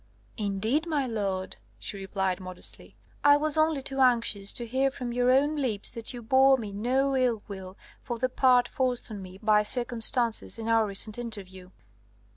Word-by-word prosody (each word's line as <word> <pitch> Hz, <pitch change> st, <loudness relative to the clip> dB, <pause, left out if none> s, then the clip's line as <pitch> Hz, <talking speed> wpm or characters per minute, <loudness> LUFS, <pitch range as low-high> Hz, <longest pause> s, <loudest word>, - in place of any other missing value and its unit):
"Indeed, 220 Hz, -, 0 dB
my 295 Hz, -4 st, 0 dB
lord," 200 Hz, -5 st, -3 dB, 0.2 s
she -, -, -4 dB
replied 190 Hz, -1 st, -2 dB
modestly, 185 Hz, -1 st, -6 dB, 0.3 s
"I 285 Hz, 0 st, +7 dB
was 305 Hz, 0 st, -1 dB
only 310 Hz, -3 st, +2 dB
too 270 Hz, 0 st, -5 dB
anxious 230 Hz, -6 st, +2 dB
to 240 Hz, -, -5 dB
hear 260 Hz, +4 st, +1 dB
from 250 Hz, -2 st, -6 dB
your 245 Hz, 0 st, +2 dB
own 285 Hz, +4 st, +3 dB
lips 230 Hz, -8 st, -1 dB
that 230 Hz, -2 st, -3 dB
you 245 Hz, -2 st, -8 dB
bore 265 Hz, +3 st, +5 dB
me 215 Hz, -5 st, -6 dB
no 260 Hz, +6 st, +1 dB
ill 245 Hz, -5 st, +1 dB
will 190 Hz, -2 st, -8 dB, 0.2 s
for 240 Hz, -, -5 dB
the 255 Hz, +3 st, +1 dB
part 250 Hz, -1 st, +3 dB
forced 250 Hz, -3 st, -2 dB
on 205 Hz, -2 st, -6 dB
me 185 Hz, 0 st, -10 dB
by 210 Hz, -1 st, +4 dB
circumstances 240 Hz, 0 st, +1 dB
in 225 Hz, 0 st, -6 dB
our 225 Hz, -1 st, +3 dB
recent 210 Hz, +3 st, 0 dB
interview. 190 Hz, -6 st, -8 dB
235 Hz, 175 wpm, -27 LUFS, 205-260 Hz, 0.3 s, I